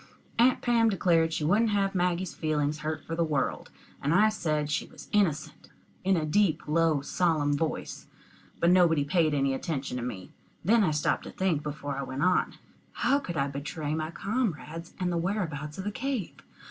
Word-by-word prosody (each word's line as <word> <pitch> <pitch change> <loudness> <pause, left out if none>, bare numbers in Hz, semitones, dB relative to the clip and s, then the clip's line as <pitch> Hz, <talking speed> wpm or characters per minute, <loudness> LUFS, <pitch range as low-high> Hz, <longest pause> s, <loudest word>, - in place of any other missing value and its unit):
Aunt 250 +2 +4
Pam 230 -2 +4
declared 170 -5 +2
she 160 - -2
wouldn't 210 +9 +3
have 200 -2 +1
Maggie's 180 -1 0
feelings 150 -1 -1
hurt 155 +1 -4
for 165 - -4
the 170 - +1
world; 150 -4 -1 0.3
and 145 +4 +1
I 215 +4 +6
said 155 -8 -1
she 150 - -1
was - - -13
innocent, 190 -8 0 0.3
in 190 -1 +3
a 155 - 0
deep 185 0 +1
low 160 -1 +2
solemn 150 -1 +1
voice, 155 +2 -3 0.5
but 170 - +4
nobody 170 -5 +4
paid 155 0 +2
any 135 -1 +1
attention 135 -2 -3
to 120 - -3
me. 95 -7 -6 0.3
Then 225 +3 +5
I 185 - +3
stopped 150 -1 0
to - - -7
think 180 -6 0
before 145 -2 -5
I - - -2
went 135 +1 -3
on. 180 0 +2 0.4
How 275 +4 +2
could 175 - -5
I 140 - +1
betray 145 +2 -4
my 155 0 -2
comrades 170 - -3
and 180 -1 0
the 170 - 0
whereabouts 165 -6 -3
of 190 - -4
the 205 - -2
cave? 260 -4 -3
165 Hz, 185 wpm, -28 LUFS, 150-190 Hz, 0.5 s, I